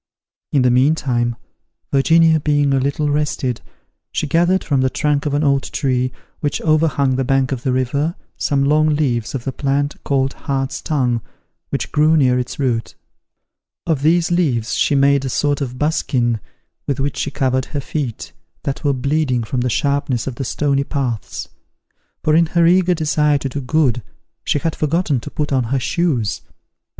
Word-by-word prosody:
In 140 -3 +3
the 125 - +4
meantime, 125 -3 +2 0.6
Virginia 160 +4 +4
being 145 -1 +2
a 135 - +3
little 140 +2 0
rested, 145 -4 -1 0.5
she - - -1
gathered 175 +5 +2
from 140 -4 +1
the 130 - +2
trunk 150 +1 0
of 145 - 0
an 145 - +1
old 140 -2 +3
tree, 130 -3 0 0.3
which 145 -1 -1
overhung 150 -4 +2
the 135 - +1
bank 135 0 +1
of 130 -3 -2
the 130 -1 0
river, 140 +6 0 0.2
some 140 -1 0
long 155 +2 +3
leaves 130 -3 -1
of 125 - -4
the 135 - -2
plant 140 +1 -1
called 135 -1 0
hart's 135 -2 -3
tongue, 125 -6 0 0.5
which - - -3
grew 155 +2 +4
near 125 -3 +3
its 125 - -4
root. 120 -5 -1 0.9
Of 160 -5 0
these 165 +3 +2
leaves 135 -10 +1
she 145 - +2
made 140 0 +3
a 135 - -2
sort 145 +2 0
of 125 -2 -4
buskin, 125 -6 0 0.5
with 140 -2 -1
which 140 +1 -2
she - - -1
covered 130 -2 0
her 145 - -4
feet, 120 - -4 0.3
that 140 - -3
were 145 -2 +2
bleeding 135 -2 0
from 120 +3 -2
the 125 - 0
sharpness 140 -2 0
of 135 - -3
the 130 - -5
stony 140 +1 0
paths; 130 -7 -3 0.8
for 155 - +2
in 165 0 +4
her 170 +1 +2
eager 180 +1 +4
desire 150 -2 +2
to 140 -1 -4
do 140 +2 -4
good, 130 -3 +1 0.4
she - - +1
had 160 +2 -2
forgotten 155 -2 0
to - - -8
put 150 -2 -2
on 130 -2 +2
her 130 +4 0
shoes. 125 - 0
140 Hz, 175 wpm, -19 LUFS, 130-150 Hz, 0.9 s, the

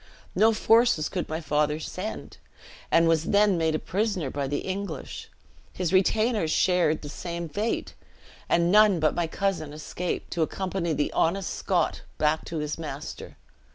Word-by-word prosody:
No 220 +1 +5
forces 225 -7 +3
could 180 -3 -3
my 160 +1 -2
father 150 -1 0
send; 185 +6 -6 0.5
he - - +6
was 165 -1 +2
then 205 0 +4
made 160 -2 +1
a - - +2
prisoner 190 - -2
by 140 -1 -2
the 145 +1 -2
English; 190 -6 -5 0.4
his 180 -1 -2
retainers 215 -1 +2
shared 175 -2 +2
the - - -6
same 170 +2 -5
fate, 210 +8 -2 0.6
and 170 +1 +3
none 210 -3 +6
but 155 -1 +2
my 175 -1 -1
cousin 170 -4 -2
escaped, 170 +3 -4
to 170 - -1
accompany 180 0 -1
the 145 0 -1
honest 180 +3 0
Scotch - - 0 0.2
back 155 +1 +1
to 165 - -5
his 150 +1 -3
master. 150 -2 -7
170 Hz, 155 wpm, -26 LUFS, 155-195 Hz, 0.6 s, he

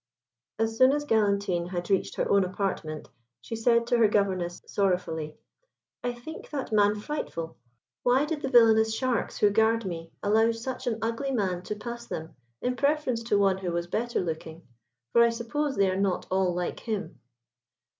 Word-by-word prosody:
As 225 0 -1
soon 260 +1 +7
as 295 0 -1
Galantine 200 -7 +1
had 175 0 -4
reached 195 - +1
her - - 0
own 200 -1 +4
apartment, 180 -5 -3 0.3
she 225 - -6
said 235 +1 +3
to 240 0 +2
her 225 - +6
Governess, 190 -4 0
sorrowfully, 165 -6 -1 0.7
"I 245 - 0
think 245 +7 -9
that 275 -5 -4
man 205 -1 +4
frightful. 205 - -5 0.5
Why 255 +4 +3
did 305 -1 -3
the 270 - -2
villainous 220 -3 +5
sharks 255 -2 -1
who 205 - +4
guard 220 +1 +2
me 165 -3 -5
allow 220 +3 +3
such 255 +3 -5
an 225 -2 0
ugly 230 +5 -1
man 195 -8 0
to 210 +3 -5
pass 235 +3 -7
them, 160 +1 -6 0.3
in 250 0 0
preference 280 -3 +1
to 210 -3 +2
one 195 -1 +3
who 180 -2 -3
was 170 0 -1
better 235 +7 -1
looking? 160 -1 -5 0.5
for 235 - +5
I 235 - +5
suppose 240 +5 -2
they 195 -1 +3
are - - -1
not 195 -1 0
all 190 -1 +2
like 175 0 -3
him." 215 -3 -4
215 Hz, 175 wpm, -27 LUFS, 185-240 Hz, 0.7 s, soon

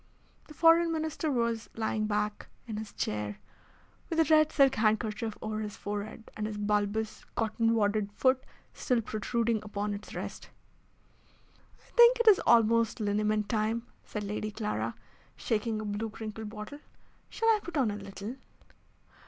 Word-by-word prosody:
The 300 - -13
Foreign 330 +1 +5
Minister 315 -1 -2
was 235 -3 -1
lying 220 -1 -1
back 210 0 -1 0.2
in 220 -3 -5
his 215 -1 -6
chair, 105 -1 -3 0.7
with 330 - -1
a - - +7
red 310 0 +5
silk 275 -2 +5
handkerchief 220 0 0
over 215 0 -2
his 210 -1 -5
forehead, 210 +2 -6
and 215 0 -2
his 215 -1 -5
bulbous, 210 +1 -1
cotton 225 +1 +1
wadded 205 -1 +1
foot 260 +3 +2 0.3
still 245 -3 0
protruding 225 +1 -1
upon 205 0 -3
its 205 +1 -8
rest. - - -6 1.4
"I - - -24
think 475 +1 +7
it 470 - +1
is 415 -4 +8
almost 230 -1 +4
liniment 210 0 +1
time," 220 +2 0 0.2
said 210 - -5
Lady 210 +1 -3
Clara, 210 0 -3 0.4
shaking 220 -1 -1
a 215 - -4
blue 210 +2 -2
crinkled 215 0 -6
bottle. 215 +6 -8 0.5
"Shall 455 - +1
I 440 -1 +5
put 345 -4 -5
on 250 -6 +2
a - - -4
little?" 200 +4 -7
220 Hz, 155 wpm, -30 LUFS, 210-240 Hz, 1.4 s, is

